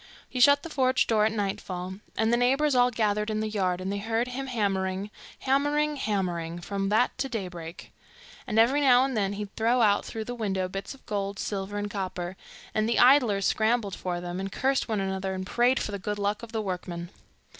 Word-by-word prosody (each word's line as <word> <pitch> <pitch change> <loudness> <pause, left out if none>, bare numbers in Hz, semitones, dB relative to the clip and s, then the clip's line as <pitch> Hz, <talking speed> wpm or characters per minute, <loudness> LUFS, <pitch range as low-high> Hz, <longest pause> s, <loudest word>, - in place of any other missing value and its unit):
He 255 - -5
shut 285 +3 +6
the 335 - -6
forge 260 -3 +2
door 215 -2 +3
at - - -1
nightfall, 190 -3 -4 0.2
and 220 +1 +2
the - - +4
neighbours 270 +4 +2
all 245 -1 +5
gathered 210 -2 0
in 215 0 -1
the 215 - -1
yard, 185 -4 0
and 185 +1 -3
they 200 - -2
heard 225 +3 -1
him 270 +2 -4
hammering, 195 -4 -1 0.3
hammering, 290 +3 +1
hammering, 175 -7 -2
from 195 +2 -2
that 220 +4 +2
to 270 - -1
daybreak; 180 -7 -6 0.6
and 215 - -2
every 250 +6 +5
now 255 -2 +6
and 270 -2 -3
then 200 -2 0
he'd 205 0 -6
throw 235 +3 +2
out 205 -1 +3
through 220 -1 -5
the 245 - -4
window 195 -5 -1
bits 195 +7 -6
of 275 - -22
gold, 200 -2 -3
silver, 200 0 -3
and 205 0 -3
copper; 185 -2 -4 0.4
and 215 +1 +1
the 235 - +1
idlers 245 -7 +5
scrambled 220 -2 +1
for 180 -1 -3
them, 175 +1 -5
and 195 0 -4
cursed 270 +4 0
one 220 -3 -1
another, 190 0 -2
and 185 0 -4
prayed 245 +6 +2
for - - -3
the 200 - -4
good 210 +2 -3
luck 205 +1 -1
of 235 -1 -9
the 220 -1 -2
workman. 180 -2 -5
210 Hz, 210 wpm, -27 LUFS, 190-245 Hz, 0.6 s, shut